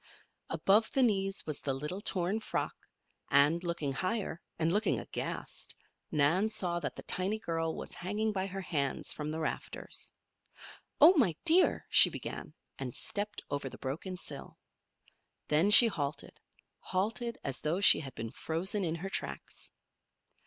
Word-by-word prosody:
Above 215 +3 +2
the 265 - +3
knees 195 -4 0
was 155 -2 -4
the 135 -2 -2
little 150 +8 -5
torn 185 +2 0
frock, 220 - -4 0.4
and, 145 +5 +4
looking 170 -5 -2
higher, 185 +2 -3 0.2
and 165 +1 +1
looking 210 +2 +1
aghast, - - -6 0.3
Nan 160 +9 +2
saw 175 -5 0
that - - -5
the - - -9
tiny 190 +4 -1
girl 165 -6 -3
was - - -8
hanging 210 +4 -2
by 190 -2 -2
her 195 0 -6
hands 140 -7 -2
from 150 0 -5
the 160 +1 -4
rafters. 160 - -4 0.9
"Oh, 320 +5 +9
my 195 - +3
dear!" 350 +4 +5
she - - +9
began, - - -7 0.2
and - - -5
stepped 205 0 -4
over 145 -1 -3
the - - -11
broken 165 +8 -5
sill. 145 -5 -6 0.9
Then 155 +7 +3
she 235 +3 +10
halted 150 -10 -4 0.4
halted 225 +5 -2
as 135 -2 -1
though 160 +5 -1
she 200 - +8
had 135 -4 -8
been 115 0 -5
frozen 185 - -1
in 165 -2 -1
her 185 +4 -5
tracks. - - -5
180 Hz, 150 wpm, -31 LUFS, 150-205 Hz, 0.9 s, she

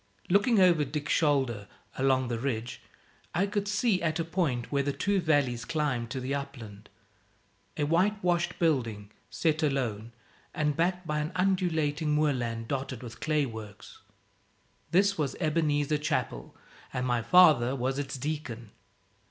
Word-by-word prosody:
Looking 205 +3 +4
over 175 -5 +5
Dick's 145 +1 -2
shoulder 130 -9 +1 0.3
along 130 -1 +2
the 120 -1 -2
ridge 120 -2 -3 0.5
I 185 +4 +3
could 205 0 -2
see, 205 -1 +1
at 160 -2 0
a 165 - -1
point 160 -9 -1
where 140 -1 +2
the 140 +1 -1
two 200 +7 0
valleys 140 -7 +1
climbed 130 -5 -1
to 130 - -4
the 130 +2 -3
upland, 120 -7 -7 0.9
a 150 - 0
white 180 +8 +2
washed 175 -1 +1
building, 115 -11 0 0.2
set 160 -1 0
alone, 120 -7 -1 0.4
and 150 -3 0
backed 180 +2 0
by 150 -1 -1
an 150 +2 -3
undulating 160 -5 +1
moorland 120 -7 0
dotted 130 -2 -4
with 115 -1 -9
clay 155 -2 +1
works. 110 -4 -10 0.9
This 195 +1 +3
was 140 -5 -1
Ebenezer 150 -2 +1
Chapel; - - -3 0.4
and 125 0 -2
my 120 -2 +1
father 145 -6 +5
was 130 +2 -1
its 135 -1 -4
deacon. 125 -6 -5
145 Hz, 145 wpm, -29 LUFS, 125-165 Hz, 0.9 s, over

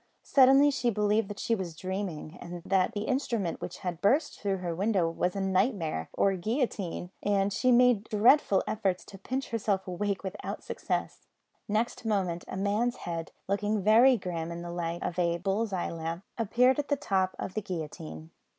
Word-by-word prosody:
Suddenly 275 +2 +6
she 250 -3 0
believed 210 0 +1
that 205 0 -7
she 230 - 0
was 185 -6 -3
dreaming, 185 -3 -4
and 175 -1 -7
that 190 -1 +2
the 205 - -2
instrument 230 -7 -1
which - - -6
had 175 -2 -3
burst 285 +9 +2
through 195 -1 0
her 175 -2 -3
window 190 -1 +1
was 180 +2 -1
a 195 - -1
nightmare 190 - 0
or 195 - +3
a 190 - -2
guillotine, 200 - -2
and 200 -1 +1
she 255 +5 +2
made 245 -3 +5
dreadful 215 -1 +4
efforts 195 -4 -1
to 195 - -12
pinch 260 +6 -3
herself 205 -4 -1
awake 195 +2 -2
without 190 - -5
success. - - -3 0.4
Next 220 +3 -1
moment 190 -6 -1
a - - -5
man's 210 +5 +1
head, 165 -1 -4 0.2
looking 205 +1 0
very 235 +5 +6
grim 170 -4 -4
in 170 0 -6
the 175 - -6
light 170 0 -3
of 180 +1 -3
a 170 -1 +2
bull's 195 +5 -1
eye 185 -2 -2
lamp, 165 +2 -4
appeared 245 +4 +3
at 290 - -2
the 285 - +2
top 190 -8 0
of 185 - -5
the 215 - -2
guillotine. 145 - -6
195 Hz, 185 wpm, -29 LUFS, 175-225 Hz, 0.4 s, Suddenly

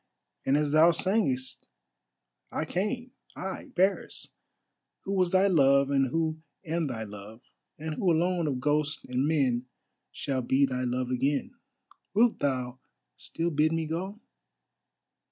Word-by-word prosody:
And 135 +2 +4
as 150 -1 0
thou 155 +3 +7
sangest, 170 - 0 0.8
I 160 - -2
came, 235 +9 -2 0.2
I 190 +1 -6
Paris, 190 +2 +1 0.7
who 195 - -4
was 185 -2 +2
thy 190 +2 +4
love, 140 -6 +4
and 135 -1 +3
who 160 +3 -1 0.3
am 165 0 -1
thy 120 -5 -4
love, 105 +3 -10 0.3
and 155 +1 -4
who 180 +3 +1
alone 170 0 +1
of 135 -3 -1
ghosts 150 +2 0
and 125 +3 0
men 130 -6 +1 0.4
shall 135 -2 -2
be 130 +3 +3
thy 130 -1 -2
love 125 0 -1
again. 140 - 0 0.6
Wilt 230 +2 +4
thou 130 -2 -1 0.4
still 170 +1 -3
bid 155 +1 +2
me 165 0 0
go?" 185 +7 -4
150 Hz, 135 wpm, -28 LUFS, 130-175 Hz, 0.8 s, thou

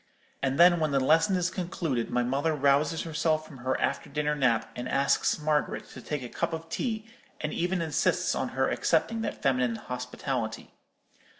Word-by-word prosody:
And 135 +1 0
then, 175 0 +7
when 155 -1 +1
the 140 -1 +2
lesson 160 +8 +4
is 180 -1 0
concluded, 170 -9 -2
my 125 - +1
mother 140 +6 0
rouses 145 +3 +2
herself 155 -1 0
from 140 -5 -12
her 130 +1 -1
after - - -1
dinner 150 0 0
nap, 130 -6 +1
and 125 +1 -4
asks 140 0 +2
Margaret 150 -1 -1
to - - -10
take 150 -3 -4
a - - -5
cup 165 - -2
of 165 0 -5
tea, 220 0 -2 0.3
and 155 - -3
even 175 0 0
insists 155 -4 +1
on - - -1
her - - +3
accepting 230 -1 +1
that - - -4
feminine 125 -3 +2
hospitality. 125 -1 -4
150 Hz, 180 wpm, -28 LUFS, 130-165 Hz, 0.3 s, then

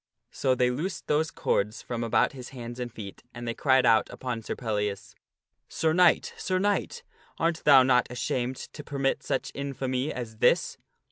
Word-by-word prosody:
So 130 -1 +1
they 125 0 +2
loosed 160 +8 -4
those 150 +1 +1
cords 105 +2 -1
from 120 -1 -3
about 115 - +2
his 125 -2 -9
hands 120 -2 -8
and 120 -1 -4
feet, 100 -3 -9
and 120 0 -6
they 115 - -1
cried 130 0 +3
out 115 -2 +4
upon 125 -3 -4
Sir - - -4
Pellias, 105 -3 -3 0.3
" - - -54
Sir 160 -1 +3
Knight, 175 -1 +4
Sir 185 - -1
Knight, 205 - -1 0.3
art 165 0 0
thou 135 -3 +8
not 125 -1 +3
ashamed 125 +1 -2
to 150 - -9
permit 140 -2 -1
such - - -2
infamy 135 -1 -2
as 115 -3 -6
this?" - - +2
125 Hz, 180 wpm, -27 LUFS, 115-145 Hz, 0.3 s, thou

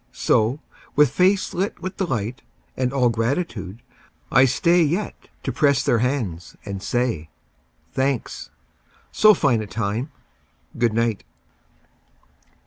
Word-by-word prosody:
So, 115 +7 +1 0.4
with 150 -3 +5
face 190 +2 +2
lit 190 +3 -2
with 185 0 -6
delight 125 - -2 0.3
And 125 -1 0
all 130 -3 +2
gratitude, 115 - -2 0.5
I 130 +3 +6
stay 170 +7 +3
Yet 170 +7 0 0.3
to 130 - -2
press 140 +1 +2
their 120 - +2
hands 115 -9 -2
and 100 -2 -5
say, 115 -10 -1 0.6
"Thanks. 130 -2 -2 0.6
So 215 -1 +6
fine 130 -9 +2
a 105 - -6
time! 110 - -3 0.6
Good 120 -2 +1
night. 115 - 0
125 Hz, 120 wpm, -22 LUFS, 110-145 Hz, 0.6 s, I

